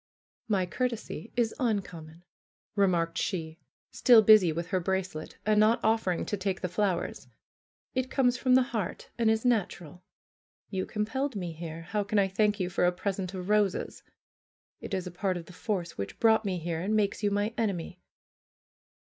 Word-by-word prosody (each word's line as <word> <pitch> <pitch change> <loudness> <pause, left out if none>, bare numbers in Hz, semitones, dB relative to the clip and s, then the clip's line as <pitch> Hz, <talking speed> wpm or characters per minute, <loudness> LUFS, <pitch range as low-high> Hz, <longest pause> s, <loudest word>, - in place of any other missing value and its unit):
"My 195 -4 +1
courtesy 230 +1 -4
is 235 -2 +1
uncommon," 175 -8 -3 0.5
remarked 180 -4 +1
she, 160 -4 -3 0.3
still 235 -4 +6
busy 210 -5 +7
with 170 +2 -4
her 185 - +1
bracelet, 185 -3 -3
and 215 0 +3
not 215 +2 +4
offering 220 -5 +1
to - - -2
take 190 -1 -2
the 180 - -1
flowers, 185 -1 -2 0.7
"it 255 0 -1
comes 250 -3 +2
from 255 0 +3
the 260 - +6
heart 230 -8 -4
and 230 -1 +3
is 220 +2 +1
natural. 180 -8 -1 0.7
You 190 -2 -2
compelled 255 +5 -2
me 180 -4 -3
here; 165 0 -7
how 205 +4 -1
can 205 +1 -1
I 200 -1 +4
thank 210 +2 +1
you 185 - 0
for 180 0 +1
a - - +3
present 190 0 -3
of 185 +1 -6
roses? 210 -3 +1 0.8
It 200 - -4
is 185 -1 -3
a 180 - -6
part 185 +1 -1
of 170 - -8
the 180 - -13
force 180 - -3
which 100 - -5
brought 220 -1 +4
me 190 -2 -1
here, 165 -1 -3
and 205 +4 0
makes 205 -1 +1
you 205 - +2
my 205 +2 0
enemy." 185 -5 -3
195 Hz, 175 wpm, -29 LUFS, 180-220 Hz, 0.8 s, busy